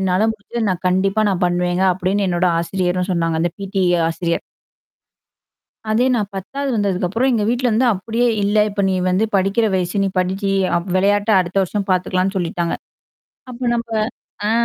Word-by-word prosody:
என்னால 190 +3 +2
முடஞ்சது 220 +1 -4
நான் 185 0 -4
கண்டிப்பா 195 +3 +1
நான் 185 -1 -2
பண்ணுவேங்க 175 +1 0
அப்படின்னு 190 +2 0
என்னோட 175 +1 +1
ஆசிரியரும் 180 +1 -1
சொன்னாங்க. 165 -2 0
அந்த 175 - +1
பிடி 195 0 -2 0.3
ஆசிரியர். 170 +1 -2 1.5
அதே 225 +4 +2
நான் 210 -4 -1
10வது 275 +9 -4
வந்ததுக்கப்பறம் 205 +4 0
எங்க 220 -3 +1
வீட்ல 245 +1 0
வந்து 240 +4 +2
அப்படியே 225 +5 -1 0.2
இல்ல 205 +1 +1
இப்ப 200 0 -2
நீ 190 - +1
வந்து 185 +4 +2
படிக்கிற 195 +4 +2
வயசு 185 +2 -1
நீ - - +1
படிச்சு, 190 +2 0 0.5
விளையாட்ட 205 +3 +2
அடுத்த 180 +1 -2
வருஷம் 200 +2 -3
பார்த்துக்கலான்னு 185 +1 0
சொல்லிட்டாங்க. 170 -1 -2 0.8
அப்ப 245 0 -10
நம்ப 235 0 -3 0.6
ஆ. - - +1
190 Hz, 150 wpm, -19 LUFS, 180-210 Hz, 1.5 s, என்னால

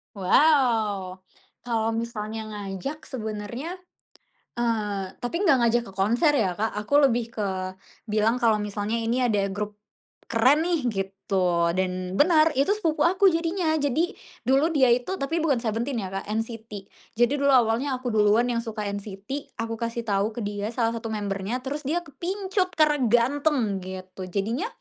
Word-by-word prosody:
Waw. 215 -5 +3 0.5
Kalau 225 -2 0
misalnya 220 -1 -4
ngajak 205 - -6
sebenarnya, 240 - -5 0.8
eee, 210 -5 -1
tapi 245 +7 -3
enggak 335 -10 +4
ngajak 235 +1 +3
ke - - -10
konser 235 - +3
ya, 200 -8 +2
Kak, 220 -1 -1
aku 210 +6 -4
lebih 235 -2 0
ke, 210 -2 -2 0.6
bilang 215 +1 +1
kalau 225 -3 +2
misalnya, 210 +2 -2
"Ini 240 +1 +1
ada 200 -1 +1
grup, 205 +1 -5 0.5
keren 255 +7 +4
nih," 340 -3 +1
gitu 190 -3 0
dan 185 0 -2
benar 315 0 +5
itu 275 - +3
sepupu 320 -6 +1
aku 380 +1 +4
jadinya. 330 -1 0
Jadi, 305 +7 +1 0.3
dulu 270 +5 +3
dia 260 -4 +5
itu 250 +10 +1
tapi 325 +2 -2
bukan 275 -7 +1
Seventeen 230 +1 -1
ya, 185 - -4
Kak, 195 +1 -5
NCT. 220 -2 -4 0.3
Jadi 240 +4 +3
dulu 280 0 +3
awalnya 250 +3 +3
aku 250 -1 -4
duluan 215 +2 +4
yang 230 - 0
suka 220 -2 -5
NCT 205 +7 -6
aku 225 0 -4
kasih 230 0 -3
tahu 205 0 0
ke 235 - -4
dia 205 0 -3
salah 230 -2 +1
satu 230 0 -5
member-nya 210 +3 -3
terus 280 +1 -4
dia 345 +3 0
kepincut 370 +5 -2
karena 300 -2 +3
ganteng 245 -2 +2
gitu 185 0 -8
jadinya, 225 - -2
230 Hz, 155 wpm, -25 LUFS, 205-280 Hz, 0.8 s, benar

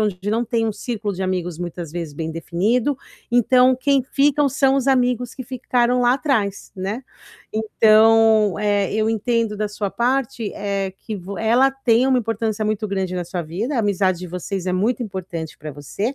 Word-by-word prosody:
onde 205 -1 -1
não 230 +2 +1
tem 230 -1 0
um 220 - -1
círculo 210 -2 -4
de 190 - -4
amigos 180 -3 -2
muitas 175 -2 -6
vezes 165 -4 -5
bem 160 +1 -4
definido, 205 - 0 0.3
então 250 +2 +4
quem 275 0 +2
ficam 285 0 +3
são 270 0 +2
os 270 - 0
amigos 250 -2 +1
que 260 - -6
ficaram 250 0 0
lá 245 0 +4
atrás, 240 -8 -1
né. 200 +7 -3 0.5
Então, 220 -1 +4
eh, 205 -2 +1
eu 220 +1 +1
entendo 225 0 0
da 210 0 -1
sua 205 -1 -3
parte, 240 -2 -1
eh, 195 -2 -2
que 220 - -6
vo 195 +1 -7
ela 240 +5 +3
tem 255 -2 +2
uma 260 -1 +3
importância 225 -1 -2
muito 215 0 -1
grande 190 -2 -2
na 180 -1 -2
sua 175 0 -4
vida, 210 - -3
a - - +3
amizade 190 -3 +1
de 180 - -7
vocês 180 +2 -4
é 180 - 0
muito 220 +7 0
importante 180 -6 -6
para 155 0 -7
você. 195 - -4
215 Hz, 185 wpm, -21 LUFS, 190-245 Hz, 0.5 s, então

